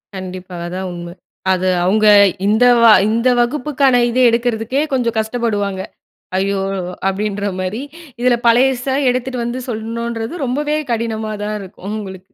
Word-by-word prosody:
கண்டிப்பா. 185 Hz, -1 st, -7 dB
அதான் 185 Hz, +1 st, -4 dB
உண்ம. 175 Hz, 0 st, -8 dB, 0.4 s
அது 185 Hz, 0 st, +1 dB, 0.2 s
அவுங்க 215 Hz, +4 st, +3 dB, 0.4 s
இந்த 220 Hz, +4 st, +3 dB, 0.2 s
வ -, -, +6 dB, 0.2 s
இந்த 230 Hz, +3 st, +2 dB
வகுப்புக்கான 265 Hz, 0 st, +2 dB
இத 240 Hz, -, -3 dB
எடுக்கறதுக்கே 235 Hz, +3 st, 0 dB
கொஞ்ச 245 Hz, -3 st, +1 dB
கஷ்டப்படுவாங்க. 215 Hz, -4 st, -2 dB, 0.6 s
"ஐயோ!" 195 Hz, 0 st, 0 dB, 0.5 s
அப்படின்ற 205 Hz, +1 st, -2 dB
மாரி. 190 Hz, +7 st, -3 dB, 0.4 s
இதில, 250 Hz, -1 st, +4 dB
பழையச 245 Hz, +2 st, +3 dB, 0.2 s
எடுத்துட்டு 250 Hz, -1 st, -2 dB
வந்து, 240 Hz, +2 st, -3 dB
சொல்லணும்ன்றது 230 Hz, +5 st, -4 dB
ரொம்பவே 295 Hz, +4 st, -1 dB
கடினமாதான் 220 Hz, -2 st, -3 dB
இருக்கும். 190 Hz, 0 st, -12 dB
அவுங்களுக்கு! 190 Hz, -3 st, -7 dB
225 Hz, 120 wpm, -17 LUFS, 195-245 Hz, 0.6 s, வ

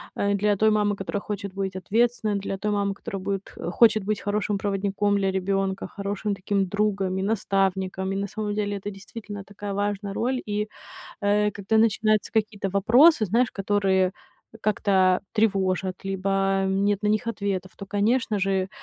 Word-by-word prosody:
а, 200 Hz, 0 st, +1 dB
для 205 Hz, +1 st, +2 dB
той 220 Hz, +2 st, +3 dB
мамы, 210 Hz, -1 st, +2 dB
которая 195 Hz, +1 st, -3 dB
хочет 200 Hz, -2 st, -5 dB
быть 195 Hz, -1 st, -3 dB
ответственной, 220 Hz, +2 st, +1 dB
для 195 Hz, 0 st, -4 dB
той 210 Hz, -, -1 dB
мамы, 200 Hz, -1 st, 0 dB
которая 195 Hz, -1 st, -6 dB
будет 195 Hz, 0 st, -3 dB, 0.2 s
хочет 215 Hz, -1 st, +4 dB
быть 210 Hz, 0 st, -1 dB
хорошим 205 Hz, 0 st, -1 dB
проводником 200 Hz, 0 st, 0 dB
для 195 Hz, -1 st, +1 dB
ребёнка, 195 Hz, 0 st, -1 dB
хорошим 200 Hz, 0 st, -3 dB
таким 195 Hz, 0 st, 0 dB
другом 195 Hz, -2 st, 0 dB
и 190 Hz, -, -1 dB
наставником. 190 Hz, -2 st, 0 dB
И 195 Hz, -, -2 dB
на 200 Hz, +1 st, -2 dB
самом 210 Hz, 0 st, -3 dB
деле, 205 Hz, -1 st, -1 dB
это, 200 Hz, +1 st, -5 dB
действительно, 205 Hz, +1 st, -9 dB
такая 205 Hz, 0 st, -7 dB
важная 205 Hz, 0 st, -2 dB
роль. 250 Hz, +5 st, 0 dB
И, 210 Hz, +1 st, -1 dB, 0.5 s
э, 210 Hz, +1 st, +2 dB
когда 205 Hz, +2 st, -1 dB
начинаются 215 Hz, -1 st, +2 dB
какие-то 210 Hz, -2 st, 0 dB
вопросы, 225 Hz, -, +5 dB
знаешь, 235 Hz, +5 st, +2 dB
которые 195 Hz, -2 st, +1 dB, 0.5 s
как-то 190 Hz, -3 st, +2 dB
тревожат, 190 Hz, -4 st, 0 dB
либо 195 Hz, 0 st, -2 dB, 0.4 s
нет 200 Hz, +1 st, +1 dB
на 210 Hz, -, 0 dB
них 215 Hz, +3 st, +1 dB
ответов, 200 Hz, -4 st, -2 dB
то, 200 Hz, -, -9 dB
конечно 210 Hz, +2 st, +1 dB
же, 190 Hz, -1 st, 0 dB
200 Hz, 165 wpm, -25 LUFS, 195-210 Hz, 0.5 s, вопросы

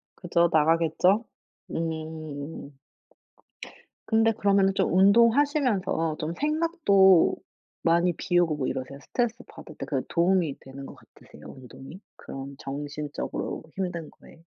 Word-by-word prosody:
그죠, 170 Hz, -1 st, +1 dB
나가겠죠? 165 Hz, +6 st, +3 dB, 0.5 s
음. 155 Hz, -3 st, -6 dB, 1.3 s
근데 225 Hz, 0 st, +3 dB
그러면은 200 Hz, -2 st, +2 dB
좀 -, -, 0 dB
운동하시면서 225 Hz, -, +3 dB
좀 160 Hz, +2 st, -3 dB
생각도 295 Hz, -, +3 dB, 0.5 s
많이 170 Hz, +1 st, +3 dB
비우고 175 Hz, -3 st, +1 dB
뭐 130 Hz, -, -2 dB
이러세요? 130 Hz, +2 st, -5 dB
스트레스 240 Hz, -, -2 dB
받을 -, -, -12 dB
때 -, -, -6 dB
그 -, -, -1 dB
도움이 170 Hz, -4 st, +1 dB
되는 135 Hz, +1 st, -10 dB
것 -, -, -11 dB
같으세요 -, -, -18 dB
운동이? 135 Hz, +7 st, -12 dB, 0.2 s
그런 135 Hz, 0 st, -9 dB
정신적으로 145 Hz, +1 st, -5 dB
힘든 180 Hz, -4 st, -4 dB
거에? 165 Hz, -, -19 dB
170 Hz, 270 characters per minute, -26 LUFS, 150-200 Hz, 1.3 s, 나가겠죠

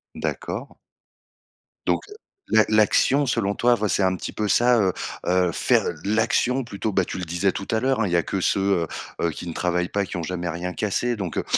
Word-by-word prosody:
D'accord. -, -, -4 dB, 1.1 s
Donc -, -, +1 dB, 0.5 s
la 110 Hz, -, +4 dB
l'action 110 Hz, +6 st, +4 dB
selon 110 Hz, -5 st, 0 dB
toi, 120 Hz, 0 st, +3 dB
voi 105 Hz, -2 st, -1 dB
c'est 100 Hz, -, +1 dB
un 95 Hz, 0 st, +2 dB
petit -, -, -6 dB
peu 105 Hz, -1 st, -1 dB
ça, 120 Hz, +3 st, +4 dB
heu 95 Hz, -3 st, +2 dB, 0.3 s
heu, 90 Hz, -1 st, +2 dB
faire -, -, +2 dB, 0.2 s
l'action 115 Hz, +5 st, +1 dB
plutôt, 110 Hz, -1 st, -4 dB
ben, 95 Hz, -2 st, +1 dB
tu -, -, -6 dB
le 90 Hz, -, -4 dB
disais 85 Hz, +4 st, 0 dB
tout 100 Hz, +1 st, -6 dB
à 110 Hz, -, +2 dB
l'heure, 130 Hz, -1 st, +1 dB
hein: 105 Hz, -, +2 dB
«Il 90 Hz, -, -3 dB
y -, -, +2 dB
a 85 Hz, -, +2 dB
que 95 Hz, -, -2 dB
ceux, 100 Hz, -, +2 dB
heu 95 Hz, -4 st, +1 dB, 0.3 s
heu, 85 Hz, -, +2 dB
qui 85 Hz, +3 st, -8 dB
ne 85 Hz, -, -4 dB
travaillent 90 Hz, 0 st, 0 dB
pas, 100 Hz, -1 st, 0 dB
qui 90 Hz, -, -6 dB
ont 85 Hz, -, -3 dB
jamais 85 Hz, 0 st, -3 dB
rien 90 Hz, +2 st, -4 dB
cassé» 120 Hz, +4 st, -1 dB
donc 95 Hz, -6 st, -5 dB
heu -, -, 0 dB
100 Hz, 225 wpm, -24 LUFS, 90-110 Hz, 1.1 s, la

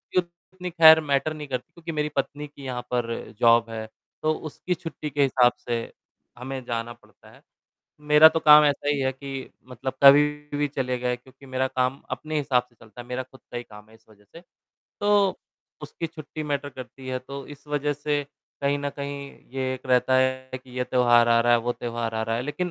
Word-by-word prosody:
ये 185 Hz, -, +5 dB
उतनी 180 Hz, +1 st, -10 dB
ख़ैर 160 Hz, -2 st, +8 dB
मैटर 145 Hz, +1 st, 0 dB
नहीं 150 Hz, -1 st, -7 dB
करती, 125 Hz, -2 st, -5 dB
क्योंकि 170 Hz, -1 st, -7 dB
मेरी 150 Hz, -1 st, -1 dB
पत्नी 145 Hz, +2 st, -2 dB
की 140 Hz, -1 st, -15 dB
यहाँ 125 Hz, -2 st, -3 dB
पर 120 Hz, -2 st, -1 dB, 0.3 s
जॉब 115 Hz, -1 st, +5 dB
है, 110 Hz, -1 st, -6 dB, 0.3 s
तो 155 Hz, 0 st, +2 dB
उसकी 155 Hz, +3 st, -4 dB
छुट्टी 165 Hz, -3 st, -6 dB
के 145 Hz, 0 st, +1 dB
हिसाब 125 Hz, -2 st, +4 dB
से 120 Hz, -1 st, -3 dB, 0.6 s
हमें 130 Hz, +1 st, -6 dB
जाना 115 Hz, 0 st, -3 dB
पड़ता -, -, -22 dB
है। -, -, -19 dB, 0.6 s
मेरा 150 Hz, +1 st, +8 dB
तो 165 Hz, -, -1 dB
काम 150 Hz, 0 st, +9 dB
ऐसा 145 Hz, 0 st, 0 dB
ही 145 Hz, -1 st, +2 dB
है 130 Hz, -1 st, +1 dB
कि 135 Hz, 0 st, -7 dB, 0.2 s
मतलब 130 Hz, +1 st, -5 dB
कभी 140 Hz, +1 st, +9 dB, 0.3 s
भी 145 Hz, 0 st, +1 dB
चले 130 Hz, -2 st, -2 dB
गए, 125 Hz, 0 st, 0 dB
क्योंकि 130 Hz, +2 st, -18 dB
मेरा 130 Hz, 0 st, -1 dB
काम 130 Hz, 0 st, -1 dB
अपने 155 Hz, 0 st, -3 dB
हिसाब 135 Hz, -4 st, +2 dB
से 120 Hz, -, -30 dB
चलता 115 Hz, +1 st, -13 dB
है, 120 Hz, -, -14 dB
मेरा 125 Hz, +1 st, -3 dB
खुद 130 Hz, +1 st, -18 dB
का 120 Hz, -, -4 dB
ही 120 Hz, -, -5 dB
काम 105 Hz, -2 st, -14 dB
है 110 Hz, -, -18 dB
इस 110 Hz, -, -26 dB
वजह 105 Hz, -1 st, -21 dB
से। 135 Hz, -, -15 dB, 0.6 s
तो 205 Hz, -2 st, +3 dB, 0.4 s
उसकी 155 Hz, +3 st, -5 dB
छुट्टी 155 Hz, -1 st, -8 dB
मैटर 145 Hz, -1 st, -2 dB
करती 130 Hz, 0 st, -10 dB
है, 130 Hz, 0 st, -1 dB
तो 140 Hz, +2 st, -9 dB
इस 145 Hz, 0 st, -13 dB
वजह 145 Hz, 0 st, 0 dB
से 145 Hz, 0 st, -1 dB, 0.4 s
कहीं 140 Hz, 0 st, +1 dB
न 145 Hz, 0 st, -2 dB
कहीं 140 Hz, 0 st, -5 dB, 0.4 s
ये 130 Hz, -1 st, -1 dB
एक 130 Hz, -, -11 dB
रहता 130 Hz, 0 st, +3 dB
है 130 Hz, 0 st, 0 dB
कि 130 Hz, 0 st, -19 dB
ये 125 Hz, -, +1 dB
त्योहार 120 Hz, -2 st, +4 dB
आ 115 Hz, 0 st, +5 dB
रहा 120 Hz, +1 st, +3 dB
है, 120 Hz, -, +5 dB
वो 120 Hz, +1 st, -1 dB
त्योहार 115 Hz, -2 st, -4 dB
आ 110 Hz, -, -1 dB
रहा 115 Hz, 0 st, -1 dB
है। 120 Hz, -, -2 dB
लेकिन 150 Hz, +6 st, -3 dB
135 Hz, 215 wpm, -25 LUFS, 125-150 Hz, 0.6 s, काम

